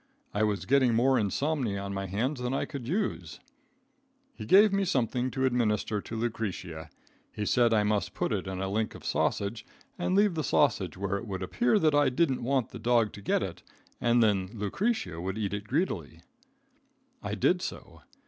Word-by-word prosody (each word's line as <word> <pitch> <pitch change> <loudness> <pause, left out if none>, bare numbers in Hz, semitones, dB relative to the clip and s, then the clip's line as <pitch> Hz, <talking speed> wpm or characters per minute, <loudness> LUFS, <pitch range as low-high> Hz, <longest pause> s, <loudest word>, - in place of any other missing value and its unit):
I 105 - 0
was 105 -4 0
getting 130 -3 +3
more 130 +2 +3
insomnia 120 - -1
on 100 0 -5
my 95 0 -3
hands 125 +8 -2
than 125 +2 -1
I - - -1
could 135 -6 -7
use. 200 - -2 0.9
He - - -8
gave 200 +2 +6
me 200 0 +2
something 125 - 0
to 130 0 -1
administer 110 -4 0
to 115 - -7
Lucretia. 95 -8 -4 0.4
He 105 - -4
said 120 +2 +3
I 110 -2 +3
must 105 -1 -1
put - - -1
it - - -2
in 95 -1 -4
a 95 - -2
link 110 +3 -1
of - - -12
sausage 100 +2 -1 0.4
and 175 +1 0
leave 205 -1 +4
the 155 -2 -2
sausage 95 - +1
where 100 0 -1
it 115 - -7
would 95 -2 -4
appear 225 - +2
that 155 -6 +3
I 145 -2 +4
didn't 130 0 +1
want 130 -1 0
the 120 - -9
dog 115 -2 +2
to 100 - -10
get - - +1
it, - - -6 0.4
and 120 0 +4
then 95 -4 +1
Lucretia 105 - -2
would 95 +3 -3
eat 105 -2 -2
it 100 0 -4
greedily. 160 - -2 1.0
I - - -3
did 180 0 +2
so. - - -7
115 Hz, 190 wpm, -29 LUFS, 100-140 Hz, 1.0 s, gave